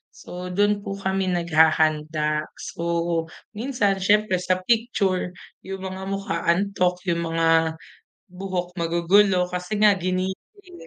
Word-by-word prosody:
So, 180 +1 -8
dun 205 +3 +1
po 200 0 -5
kami 190 -1 -1
naghahanda. 155 -2 +2
So, 170 -1 -2 0.2
minsan 210 -4 0
siyempre 205 -1 +2
sa 185 0 -1
picture, 200 -6 0 0.2
yung 190 0 -7
mga 190 0 -6
mukha 195 -5 -3
antok 180 0 +1
yung 170 0 -1
mga 165 -1 +3 0.6
buhok 180 -1 -4
magugulo 180 +3 +3
kasi 180 +4 -3
nga 210 0 +6
ginising, 190 - -4
185 Hz, 115 wpm, -23 LUFS, 170-195 Hz, 0.6 s, nga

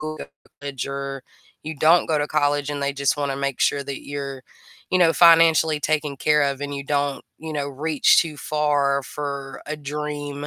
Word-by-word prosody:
go 155 0 -5
to - - -8 0.3
college 140 -3 -5
or 140 -1 -5 0.4
you 155 +1 -6
don't 165 +4 +4
go 155 -2 +1
to 145 - -1
college, 145 -1 0
and 145 -1 -4
they 140 0 0
just 140 +1 0
wanna 140 -2 -2
make 140 -2 -3
sure 140 - +2
that 140 -1 -7
you're, 140 -2 -6 0.5
you 185 - +2
know, 165 -2 +5
financially 165 -2 +5
taken 150 -1 -1
care 150 +1 +2
of 140 -1 -1
and 145 0 -4
you 140 0 -6
don't, 145 -1 -1
you 160 0 -7
know, 145 -1 -2
reach 150 +2 +2
too 155 -3 -4
far 145 -2 0
for 140 -1 -6
a 155 +1 -4
dream, 145 0 -5
145 Hz, 195 wpm, -22 LUFS, 140-150 Hz, 0.5 s, know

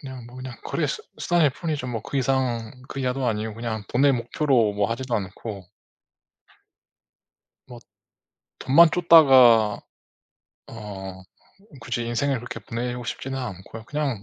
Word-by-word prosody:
그냥 130 -3 -9
뭐 125 +1 -13
그냥 130 -1 -7
거래 - - -1
수 - - -3 0.2
수단일 170 -5 +2
뿐이죠. 150 -2 -4
뭐 115 -3 -3
그 - - -5
이상 125 -4 0 0.2
그 - - -7
이하도 130 0 -1
아니고 110 -1 -2
그냥 115 -1 -4
돈을 135 +3 +3
목표로 120 -2 +1
뭐 100 +2 -1
하지도 125 +1 -3
않고. 100 0 -5 2.0
뭐 120 -1 -11 0.8
돈만 160 +5 +6
좇다가 130 -11 +6 0.9
어 95 -4 -8 0.6
굳이 120 0 -3
인생을 135 +4 0
그렇게 120 +1 -7
보내고 120 +1 -5
싶지는 135 +2 -5
않고요. 110 -1 -7
그냥, 140 -6 -3
125 Hz, 270 characters per minute, -24 LUFS, 110-135 Hz, 2.0 s, 돈만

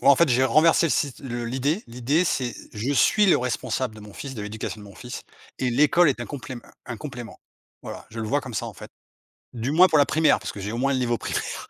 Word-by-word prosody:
Moi - - +6
en - - +3
fait, 170 +1 +4
j'ai 130 +1 +3
renversé 160 +6 +4
le - - -1
sit 140 -2 0
le 120 -3 -4
l'idée. 135 - -1
L'idée 125 +9 0
c'est 125 -7 -1 0.2
je 115 +7 -2
suis 205 +8 +4
le 185 - +6
responsable 125 -1 -2
de - - -11
mon 105 -1 -12
fils, 135 -2 -7
de 105 - -5
l'éducation 105 +1 -5
de 105 - -11
mon 100 - -13
fils, 125 0 -8 0.4
et 125 -1 0
l'école 150 +6 +4
est 125 -3 -1
un - - -4
complém 130 -3 -7 0.3
un 120 -3 -5
complément, 125 -4 -8 0.4
voilà, - - -8
je 115 0 -6
le 110 - -3
vois 145 +4 +1
comme 130 -4 -9
ça, - - -2
en - - -7
fait. - - -11 0.6
Du 120 +3 -2
moins, 180 +4 +7
pour 155 - +3
la 145 - +6
primaire, 155 +2 +3
parce - - -5
que 100 - -9
j'ai 100 +2 -4
au - - -3
moins 135 +3 +1
le 130 - 0
niveau 120 -1 0
primaire, - - -4
130 Hz, 260 wpm, -24 LUFS, 120-145 Hz, 0.6 s, moins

